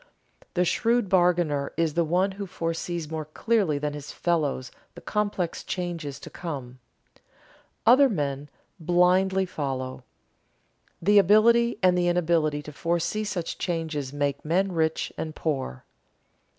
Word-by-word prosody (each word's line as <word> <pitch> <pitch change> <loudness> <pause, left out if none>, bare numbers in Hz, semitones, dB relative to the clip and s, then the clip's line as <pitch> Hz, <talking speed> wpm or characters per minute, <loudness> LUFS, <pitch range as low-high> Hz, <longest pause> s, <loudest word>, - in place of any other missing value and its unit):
The 180 0 +3
shrewd 230 +2 +1
bargainer 175 -6 +2
is 165 -2 +1
the 170 - +2
one 180 +5 +1
who 200 +1 -6
foresees 165 -1 -4
more 160 -1 -3
clearly 185 0 0
than 145 0 -2
his 145 -1 -7
fellows 150 -7 -1 0.2
the - - -9
complex 205 -5 -2
changes 170 -6 -4
to - - -10
come. 135 -7 -6 1.1
Other 260 +4 +7
men 145 - -3 0.3
blindly 180 +3 +3
follow. 135 -7 -4 1.0
The 205 +3 +6
ability 230 +4 +4
and 180 -1 +5
the 175 0 +1
inability 165 -4 +1
to 150 - -9
foresee 170 +7 -1
such 195 -5 -4
changes 160 -6 -2
make 145 -1 -2
men 185 +5 +1
rich 160 -2 -1
and 155 -1 -4
poor. 135 - -3
170 Hz, 130 wpm, -26 LUFS, 150-190 Hz, 1.1 s, Other